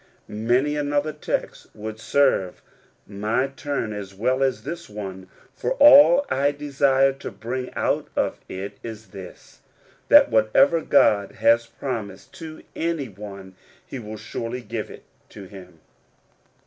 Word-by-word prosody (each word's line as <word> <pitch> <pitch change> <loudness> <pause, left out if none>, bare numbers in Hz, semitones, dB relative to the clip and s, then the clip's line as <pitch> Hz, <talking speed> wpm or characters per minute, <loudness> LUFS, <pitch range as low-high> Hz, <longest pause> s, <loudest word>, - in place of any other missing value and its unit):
Many 120 +7 0
another 145 +1 -1
text 150 - -4
would 110 +1 -7
serve 120 -7 +1 0.4
my 105 +5 -1
turn 135 -5 -4
as 100 -2 -8
well 130 +6 0
as 130 -2 0
this 170 -4 -7
one, 95 -3 -8 0.2
for - - -2
all 290 - +7
I 140 +2 +1
desire 140 -2 +2
to 135 - -8
bring 125 +3 -5
out - - 0
of - - -1
it 95 +2 -7
is 110 -1 -9
this 95 -3 -12 0.2
— - - -32
that - - +7
whatever 110 +9 +4
God 105 -9 +3
has 115 0 +3
promised 115 -5 -6
to 160 -1 -9
any 165 -6 -2
one, 100 -1 -10 0.3
he 135 - -7
will 110 -1 -8
surely 115 +3 -5
give 110 -1 -5
it - - -12 0.3
to 100 - -11
him. 95 -3 -13
115 Hz, 140 wpm, -23 LUFS, 105-140 Hz, 0.4 s, all